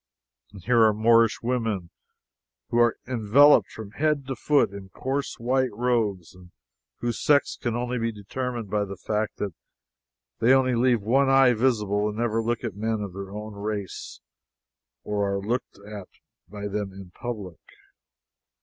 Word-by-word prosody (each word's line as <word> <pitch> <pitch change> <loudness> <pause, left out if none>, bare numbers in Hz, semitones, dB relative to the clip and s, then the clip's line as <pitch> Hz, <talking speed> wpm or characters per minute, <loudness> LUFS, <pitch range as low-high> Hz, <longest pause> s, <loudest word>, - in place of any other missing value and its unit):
And 100 -4 -12
here 120 +1 +3
are 110 -1 +5
Moorish 115 +1 +3
women 115 -8 -2 0.8
who 120 - +1
are 120 -1 +4
enveloped 130 +5 +5
from 110 -3 -9
head 150 +2 0
to 135 0 -4
foot 145 0 +2
in 100 -1 -9
coarse 135 +7 -3
white 130 +1 +1
robes, 110 -7 -1
and 90 -1 -16 0.5
whose 120 -1 -2
sex 145 -1 +3
can 120 -4 -3
only 125 +1 -2
be 115 0 -1
determined 115 +2 -5
by 105 -1 +1
the 100 -1 -7
fact 105 +3 -2
that 100 -3 -3 0.9
they 120 +3 +5
only 130 -1 +2
leave 120 -2 +2
one 135 +5 +3
eye 135 -2 +6
visible 105 -4 +1
and 105 - -6
never 115 -1 0
look 115 +1 -2
at 115 -5 -3
men 110 +1 -2
of 100 -3 -5
their 100 0 -7
own 105 +1 -7
race, 100 -2 -5 0.8
or 100 -1 -1
are - - -1
looked 115 +6 -3
at 105 -3 -9 0.4
by 105 +1 -6
them 100 -1 -3
in 95 -2 -11
public. 105 -6 -6
110 Hz, 160 wpm, -25 LUFS, 100-125 Hz, 0.9 s, eye